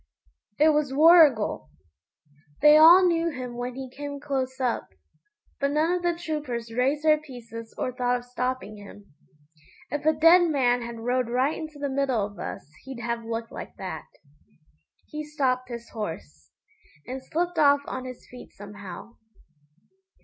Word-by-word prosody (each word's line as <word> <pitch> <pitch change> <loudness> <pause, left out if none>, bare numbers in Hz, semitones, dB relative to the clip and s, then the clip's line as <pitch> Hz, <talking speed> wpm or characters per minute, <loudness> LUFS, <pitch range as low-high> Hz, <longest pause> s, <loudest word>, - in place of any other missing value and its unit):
It 310 +1 +5
was 300 -3 +1
Warrigal! 295 - +5 0.9
They 300 0 +8
all 335 +4 +8
knew 335 -1 +2
him 255 -5 -6
when 245 +1 -5
he 265 0 -6
came 285 +2 -7
close 265 -2 -3
up, 250 -3 -1 0.7
but 280 - +1
none 310 +3 +2
of 360 - -1
the 345 -1 0
troopers 290 -9 -5
raised 270 +5 0
their 305 -1 +4
pieces 230 -5 -10
or 255 - -2
thought 250 0 0
of 245 - -11
stopping 250 -3 -4
him. 205 -3 -14 0.8
If 295 0 -3
a 315 - +5
dead 335 +3 +6
man 250 -5 +2
had 235 -1 -7
rode 245 0 0
right 260 +5 +1
into 310 -2 -8
the 285 0 -3
middle 265 -6 0
of 205 0 -11
us - - -6 0.2
he'd 265 -2 -8
have 235 0 -3
looked 225 0 -5
like - - -9
that. 160 -5 -7 1.0
He 305 0 -6
stopped 260 -4 -1
his 235 -1 -8
horse, 80 - -7 0.6
and 260 +1 -6
slipped 345 +3 -2
off 285 -1 +5
on 255 0 -5
his 255 -1 -10
feet 250 - -13
somehow. 205 +2 -10
255 Hz, 155 wpm, -26 LUFS, 235-300 Hz, 1.0 s, They